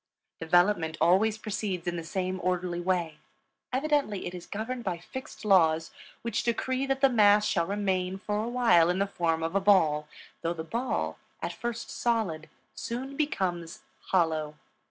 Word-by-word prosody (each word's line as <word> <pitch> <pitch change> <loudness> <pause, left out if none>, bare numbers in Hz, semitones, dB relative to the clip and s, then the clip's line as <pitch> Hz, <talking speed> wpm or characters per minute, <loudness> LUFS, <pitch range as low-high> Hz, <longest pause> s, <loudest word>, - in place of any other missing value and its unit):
Development 165 -1 +2
always 195 +6 +4
proceeds 200 -5 -3
in 175 0 -1
the 165 - -4
same 185 +2 -2
orderly 180 -1 -1
way; 175 -4 -1 0.5
evidently 275 -6 0
it 175 - -5
is 180 -1 -8
governed 235 +4 -4
by 185 -4 -2
fixed 225 +7 -9
laws 165 -5 +4 0.3
which 230 -2 -1
decree 260 +3 -1
that 270 0 0
the 275 - +7
mass 210 -3 +5
shall 170 -5 +1
remain 190 -2 -1
for 210 +2 -2
a 230 - -3
while 230 -9 +4
in 180 - +1
the 200 - +2
form 165 -4 -1
of 165 +1 -2
a 195 - +2
ball, 160 -7 +4 0.3
though 170 +1 -1
the 160 - -5
ball, 235 +9 -2 0.2
at - - -4
first 235 -1 -5
solid, 210 -10 -1 0.2
soon 260 +4 -5
becomes 185 - -2 0.2
hollow. 160 -4 +1
190 Hz, 160 wpm, -28 LUFS, 170-225 Hz, 0.5 s, the